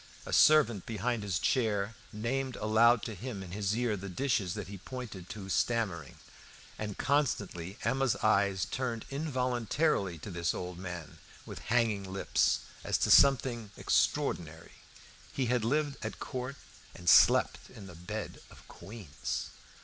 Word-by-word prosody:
A - - -5
servant 125 -10 +5
behind 115 +1 -1
his 100 -5 -1
chair 110 -4 0 0.2
named 125 +4 -2
aloud 110 +2 +4
to 110 - -4
him 105 -1 -6
in 90 - -10
his 100 +2 -1
ear 120 -3 +1
the 100 0 -7
dishes 100 -4 0
that 105 -4 -5
he 100 0 -8
pointed 105 -6 -8
to 100 -3 -7
stammering, 95 - -1 0.6
and 105 -2 -4
constantly 105 - -1
Emma's 135 -2 +1
eyes 100 -4 +3
turned 115 +3 -3
involuntarily 130 - 0
to 90 +6 -8
this 85 -1 -1
old 90 -1 -6
man 90 -4 -7 0.3
with - - -8
hanging 110 -5 +1
lips, 95 - +1 0.2
as - - +1
to - - +1
something 120 -5 +5
extraordinary. - - 0 0.6
He 135 - -1
had 125 -1 +1
lived 145 +2 0
at 110 -2 -4
court 130 +2 -5 0.4
and 90 - -11
slept - - +5
in 105 - -11
the 90 - -10
bed 85 +1 -6
of - - -16
queens! 95 -4 -6
110 Hz, 145 wpm, -31 LUFS, 95-125 Hz, 0.6 s, servant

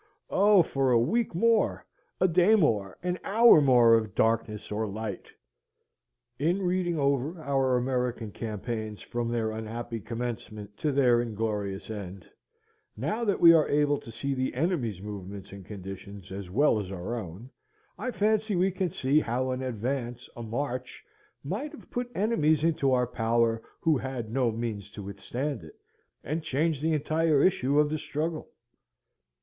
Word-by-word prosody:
Oh, 200 -1 +5
for 135 -3 0
a 120 - +5
week 220 - 0
more! 225 +3 +2 0.3
a 185 - +4
day 180 +5 +5
more, 105 - +1
an 180 0 -1
hour 225 -5 +6
more 120 -4 +6
of 110 -3 +1
darkness 110 -2 0
or 110 +1 -1
light! 105 -1 -5 1.1
In 175 +7 +1
reading 180 -2 0
over 140 +3 0
our 135 -4 +1
American 125 -3 -1
campaigns 110 0 -5
from 120 -1 -3
their 115 -2 -1
unhappy 115 +1 -5
commencement 110 -2 -6
to 150 - 0
their 125 -4 +4
inglorious 105 -3 -3
end, 95 -4 -7 0.7
now 160 - -2
that 200 -3 +1
we 170 -1 +9
are 160 -2 +4
able 145 0 +2
to 115 - -11
see 135 +5 -3
the 130 -1 -2
enemy's 125 - -1
movements 100 -1 -7
and 100 -1 -10
conditions 95 0 -9
as 95 -1 -6
well 120 +3 +3
as 95 -2 -5
our 95 +4 -4
own, 110 +2 -7 0.4
I 255 - -4
fancy 215 0 +1
we 185 +2 +2
can 185 -1 -1
see 140 0 +2
how 130 -1 -1
an 130 0 -3
advance, 125 0 -3
a 120 - -7
march, 125 +3 -4 0.4
might 220 - -4
have 305 - -14
put 245 0 -3
enemies 160 -8 +2
into 155 -5 +2
our 125 -1 +3
power 115 -1 +1 0.2
who 155 -4 +3
had 125 -4 -5
no 125 -1 +2
means 110 -3 -4
to 105 - -7
withstand 120 +7 -4
it, 80 - -13 0.5
and 155 +3 -2
changed 155 0 0
the 160 +1 +1
entire 155 0 +2
issue 145 -6 +2
of 150 0 +3
the 155 - -1
struggle. 155 +3 -3
125 Hz, 160 wpm, -28 LUFS, 110-155 Hz, 1.1 s, we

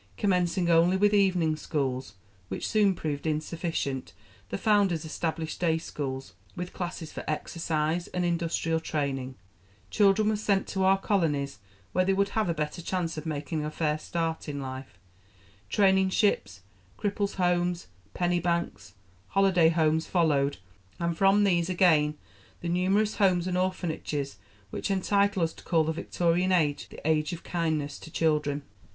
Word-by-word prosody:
Commencing 180 -2 +1
only 170 +2 +4
with 205 +1 +3
evening 180 -6 +3
schools, 135 -8 -3 0.3
which 95 - -4
soon 205 -3 +3
proved 150 -2 -3
insufficient, 155 - -2 0.4
the - - -2
founders 200 -7 +2
established 160 0 -3
day 165 -2 +2
schools, 135 -4 -5 0.2
with 180 0 -5
classes 175 -3 -5
for - - -6
exercise 160 +1 -1
and 180 -1 -2
industrial 165 -1 0
training: 135 -5 -3 0.6
children 210 +1 +4
were 215 - +1
sent 205 -2 +1
to 190 - -2
our 190 +1 +5
colonies 150 - 0 0.3
where 185 - +2
they 195 +1 +2
would 200 +1 +1
have 215 -3 0
a - - +2
better 150 +3 -3
chance 170 -1 -2
of 155 +1 -6
making 155 +1 -3
a 150 - -2
fair 155 -1 -1
start 165 -1 -3
in 145 -1 -4
life; 130 -5 -7 0.7
training 190 -2 +4
ships, 185 - +1 0.4
cripples' 205 -1 -1
homes, 175 -1 +1 0.3
penny 175 0 +1
banks, 170 - -2 0.3
holiday 190 -4 +4
homes 160 -1 +2
followed, 145 -5 +2 0.4
and 170 0 -1
from 195 +3 +4
these 175 -3 +2
again 155 -5 +3 0.4
the 170 - -3
numerous 195 +5 +1
Homes 185 -4 +3
and 185 -1 -1
Orphanages 160 - -2 0.3
which - - -3
entitle 200 -1 +2
us 165 - 0
to - - -15
call 165 -3 +2
the 160 +1 -1
Victorian 175 +3 0
Age 155 -6 +1
the - - -7
Age 155 +2 +1
of 170 - -7
Kindness 155 -4 -2
to - - -11
Children. 150 -3 0
170 Hz, 150 wpm, -28 LUFS, 155-185 Hz, 0.7 s, our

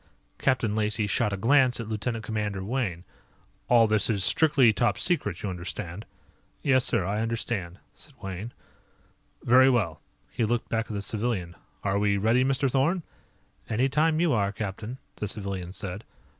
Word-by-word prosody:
Captain 120 -6 +1
Lacey 105 0 +1
shot 105 +1 0
a 100 - -2
glance 125 +3 +4
at 115 - -5
Lieutenant 110 +1 -3
Commander 105 -4 -2
Wayne. 100 -6 -2 0.7
"All 120 -2 +6
this 110 -1 +2
is 100 -4 +1
strictly 140 - +4
Top 120 +3 +1
Secret 105 - 0
you 100 - -1
understand." 90 +2 -6 0.6
"Yes, 130 -2 +4
sir; 115 -9 0
I 105 +3 -1
understand," 115 -6 -3 0.2
said 145 -3 -15
Wayne. 95 +4 -6 0.9
"Very 130 +2 +6
well." 105 -11 0 0.3
He - - -1
looked 115 +1 0
back 115 0 -1
at - - -6
the 100 -1 -3
civilian. 100 -5 -2 0.3
"Are 100 0 +1
we 100 -1 +2
ready, 115 +5 +3
Mr. 135 +1 +1
Thorn?" 145 +7 +1 0.7
"Anytime 140 +7 +2
you 170 -4 +3
are, 100 -3 +1
captain," 105 +4 -5 0.2
the 105 - -3
civilian 95 -3 -5
said. 95 +2 -6
110 Hz, 155 wpm, -27 LUFS, 100-125 Hz, 0.9 s, All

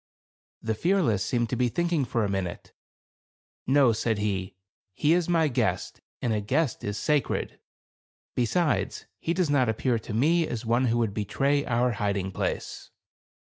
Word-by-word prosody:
The 110 - 0
Fearless 135 - +1
seemed 120 -1 -1
to - - +1
be 125 0 +1
thinking 170 0 0
fora 115 -3 0
minute. 95 -3 -4 0.9
"No," 135 -3 +5
said 110 0 0
he, 100 -3 -2 0.4
"he 150 +8 +3
is 175 0 +1
my 165 -2 +3
guest, 130 - -1 0.2
and 120 -3 +1
a 105 - 0
guest 135 +5 0
is 105 0 -3
sacred; 145 +7 -1 0.7
be 120 - +1
sides, 165 -3 0
he 170 - -1
does 175 -5 +1
not 130 -5 +3
appear 115 +2 0
to 110 - -7
me 160 +7 +3
as 120 0 -4
one 120 +3 +2
who 115 0 +1
would 115 -4 0
betray 140 +8 0
our 120 0 +2
hiding 100 -3 -1
place." - - -4
120 Hz, 160 wpm, -27 LUFS, 105-145 Hz, 0.9 s, No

